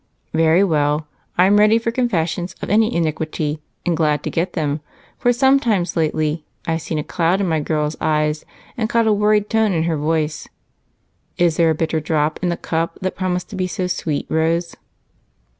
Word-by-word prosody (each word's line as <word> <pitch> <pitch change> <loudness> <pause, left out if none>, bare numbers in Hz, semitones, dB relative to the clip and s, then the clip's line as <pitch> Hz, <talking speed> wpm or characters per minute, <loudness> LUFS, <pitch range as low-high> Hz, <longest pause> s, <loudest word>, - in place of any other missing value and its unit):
"Very 165 +3 +4
well, 150 -3 +1 0.3
I'm 195 +3 +5
ready 215 +2 +5
for 230 0 -1
confessions 180 -8 -1
of - - -5
any 220 +2 +4
iniquity 155 -2 -2 0.2
and 175 -2 +1
glad 150 -2 +1
to - - -3
get 170 +3 -1
them, 150 -2 -1 0.4
for 245 - +3
sometimes 245 -7 +2
lately 155 -1 0 0.2
I've 165 0 -1
seen 160 - -3
a 150 - -1
cloud 175 +3 +1
in 200 - 0
my 160 -2 +1
girl's 150 0 -1
eyes 150 0 0 0.3
and 220 -2 -1
caught 230 -1 +2
a 220 - +4
worried 210 0 +2
tone 220 -3 +2
in 160 -2 +1
her 165 -1 0
voice. 155 0 -1 0.9
Is 170 -2 +2
there 165 -1 +4
a 160 - +2
bitter 160 0 0
drop 155 0 0
in 180 - 0
the 170 - -1
cup 165 0 -2
that 185 - -2
promised 180 0 -2
to - - -6
be 185 -1 -1
so 185 0 -3
sweet, 160 -4 -2
Rose?" 165 +2 0
165 Hz, 185 wpm, -20 LUFS, 155-195 Hz, 0.9 s, I'm